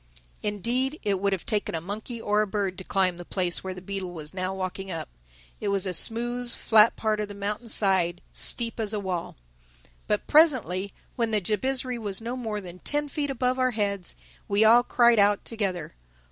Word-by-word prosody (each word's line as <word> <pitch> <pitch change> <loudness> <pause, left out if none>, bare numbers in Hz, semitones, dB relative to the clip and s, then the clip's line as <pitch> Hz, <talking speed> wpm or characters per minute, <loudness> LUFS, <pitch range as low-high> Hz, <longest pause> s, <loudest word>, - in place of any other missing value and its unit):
Indeed 240 - -1
it 200 -2 0
would 200 +1 +1
have 190 -3 -2
taken 210 -5 -1
a - - -1
monkey 215 +7 -6
or 210 -1 +1
a 215 - 0
bird 195 -2 -2
to - - -7
climb 185 -2 0
the 175 - -8
place 180 -1 -2
which 190 -1 -5
the 185 - -10
beetle 195 -1 -4
was 155 -3 -8
now 185 0 -2
walking 190 0 -5
up. 165 - -5 0.5
It 210 - -3
was 200 -1 +1
a 185 - -2
smooth, 240 +6 +1
flat 220 -1 +5
part 215 -1 0
of 210 - -2
the 205 - -9
mountain's 210 +3 -3
side, 180 -4 +2
steep 230 -1 +3
as 215 -1 0
a - - -1
wall. 185 -4 -4 0.7
But - - 0
presently, 255 - +3 0.3
when 230 -2 +1
the 215 -1 +2
Jabizri 250 +5 -1
was 205 -4 0
no 235 +2 -4
more 220 -4 -3
than 180 -1 -10
ten 295 +5 -1
feet 285 0 -2
above 255 -1 0
our 255 0 +2
heads, 200 -3 -2 0.3
we 205 +2 +3
all 230 +2 +7
cried 240 -2 +4
out 205 0 +3
together. 195 - -3
205 Hz, 200 wpm, -26 LUFS, 190-235 Hz, 0.7 s, all